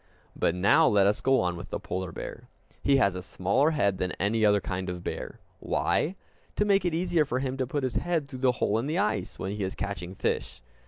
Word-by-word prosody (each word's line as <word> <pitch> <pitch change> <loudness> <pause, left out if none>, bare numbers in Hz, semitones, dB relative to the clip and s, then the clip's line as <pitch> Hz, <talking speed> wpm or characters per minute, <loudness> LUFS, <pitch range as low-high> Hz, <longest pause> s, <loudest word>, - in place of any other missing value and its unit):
But 85 - +1
now 95 +3 +5
let 100 -2 +4
us 105 +1 +2
go 135 -2 +3
on 90 -1 0
with 85 - -8
the - - -3
polar 90 -1 -4
bear. - - -8 0.3
He 140 -1 +4
has 100 -8 +3
a 90 - -5
smaller 100 - +1
head 100 -12 +1
than 90 -1 -1
any 110 +3 0
other 105 -1 +5
kind 95 -1 -4
of 90 -1 -5
bear. - - -5 0.2
Why? 175 +5 0 0.4
To 210 - +2
make 200 -2 +3
it 170 -2 +1
easier 175 -2 +2
for 130 -3 -2
him 130 0 -2
to 130 -1 -1
put 145 +2 -2
his 130 -2 -1
head 170 -5 0
through 130 -3 -8
the 130 -1 +3
hole 110 -2 +1
in 125 - -2
the 155 +3 -1
ice, 205 +2 -1
when 95 - -3
he 105 0 -3
is 95 - -3
catching 95 -2 -5
fish. - - -2
110 Hz, 235 wpm, -28 LUFS, 95-145 Hz, 0.4 s, now